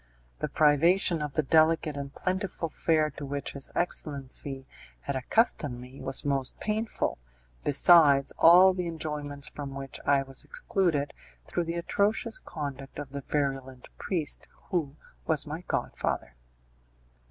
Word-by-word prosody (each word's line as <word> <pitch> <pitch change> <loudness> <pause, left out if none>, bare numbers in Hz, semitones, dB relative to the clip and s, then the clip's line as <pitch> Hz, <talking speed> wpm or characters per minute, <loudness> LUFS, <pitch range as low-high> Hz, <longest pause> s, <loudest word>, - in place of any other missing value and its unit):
The - - -1
privation 165 +3 +3
of 150 -2 -4
the 155 - +1
delicate 155 +1 +3
and 140 -1 -5
plentiful 185 0 -3
fare 155 -1 +1
to - - -9
which 140 0 -3
his 140 -1 +2
excellency 140 -4 -2 0.4
had 140 - -3
accustomed 135 - +1
me 125 +2 -11
was 135 +1 -3
most 135 -2 -1
painful, 215 - -2 0.4
besides 145 -2 +6
all 180 +3 +8
the 180 -1 -3
enjoyments 150 -3 -4
from 140 -2 -7
which 135 -1 -7
I 140 -1 +3
was 135 0 -4
excluded 180 - -1 0.3
through 175 - -2
the 165 +1 -3
atrocious 210 +6 0
conduct 140 -4 -7
of 145 -2 -7
the 140 0 -5
virulent 135 -3 -3
priest, 165 -7 -2 0.2
who 155 -6 -1 0.3
was 155 -2 +2
my 155 +3 -6
godfather. 65 - -2
150 Hz, 135 wpm, -28 LUFS, 140-170 Hz, 0.4 s, all